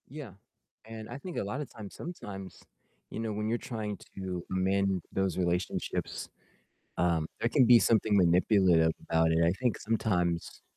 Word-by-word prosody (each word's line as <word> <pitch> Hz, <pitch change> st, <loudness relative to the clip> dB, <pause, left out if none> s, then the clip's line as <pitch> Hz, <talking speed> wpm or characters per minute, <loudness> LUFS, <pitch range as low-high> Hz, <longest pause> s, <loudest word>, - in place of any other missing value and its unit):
Yeah, 140 Hz, -5 st, -8 dB, 0.5 s
and 110 Hz, -1 st, -8 dB
I 120 Hz, -, -6 dB
think 175 Hz, +4 st, -7 dB
a -, -, 0 dB
lotta 130 Hz, +9 st, -3 dB
times 110 Hz, -5 st, -10 dB
sometimes, 100 Hz, -, -8 dB, 0.5 s
you -, -, -6 dB
know, 110 Hz, -1 st, -2 dB
when 105 Hz, +1 st, -2 dB
you're 115 Hz, +2 st, +1 dB
trying 110 Hz, -6 st, -5 dB, 0.2 s
to 90 Hz, -2 st, -4 dB
amend 95 Hz, 0 st, +1 dB
those 95 Hz, -2 st, 0 dB
relationships, 90 Hz, 0 st, -2 dB, 0.7 s
um, 85 Hz, -3 st, +1 dB
there 115 Hz, -, +2 dB
can 130 Hz, +1 st, +4 dB
be 120 Hz, 0 st, +8 dB
something 110 Hz, -2 st, +3 dB
manipulative 90 Hz, -2 st, +4 dB, 0.2 s
about 80 Hz, 0 st, +3 dB
it, 80 Hz, +1 st, +3 dB
I 85 Hz, -, +4 dB
think 125 Hz, -3 st, +1 dB
sometimes 90 Hz, -6 st, -1 dB
100 Hz, 155 wpm, -30 LUFS, 90-115 Hz, 0.7 s, be